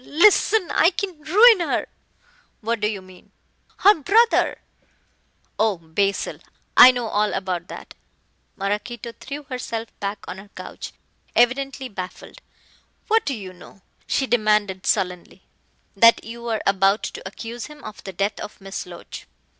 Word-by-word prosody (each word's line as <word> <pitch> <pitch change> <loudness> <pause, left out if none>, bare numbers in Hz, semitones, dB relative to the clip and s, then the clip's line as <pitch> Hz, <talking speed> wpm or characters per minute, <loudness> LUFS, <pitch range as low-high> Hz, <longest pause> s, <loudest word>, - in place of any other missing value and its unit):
Listen, 370 +5 +3
I 330 - +5
can 380 0 -4
ruin 420 +8 +6
her 340 - -1 0.4
" - - -35 0.3
"What 230 +1 -1
do 210 - +1
you 205 -3 -4
mean?" 185 -1 -17 0.5
"Her 410 - +7
brother 455 - +3 0.5
" - - -42
"Oh, 215 -3 +2
Basil, 180 +5 -2 0.4
I 250 - +11
know 245 -2 0
all 210 0 +1
about 185 -2 -3
that." - - -10 0.6
Maraquito 210 +4 -4
threw 290 +2 -7
herself 230 -4 -5
back 200 +1 -4
on 190 - -7
her 200 +1 -14
couch, - - -8 0.4
evidently 265 +2 +1
baffled. 185 -5 -9 0.7
"What 445 -4 +2
do 275 - 0
you 190 -4 -8
know?" 180 +1 -16 0.2
she 270 - +1
demanded 210 -5 +1
sullenly. 180 0 -1 0.5
"That 230 +3 +6
you 235 +1 -8
are 225 -2 -2
about 195 +1 +3
to - - -5
accuse 225 +4 -7
him 300 0 -14
of 215 -1 -10
the 195 - -6
death 200 +3 -2
of 210 - -8
Miss 195 -1 -7
Loach." 175 -1 -10
220 Hz, 150 wpm, -22 LUFS, 195-270 Hz, 0.7 s, I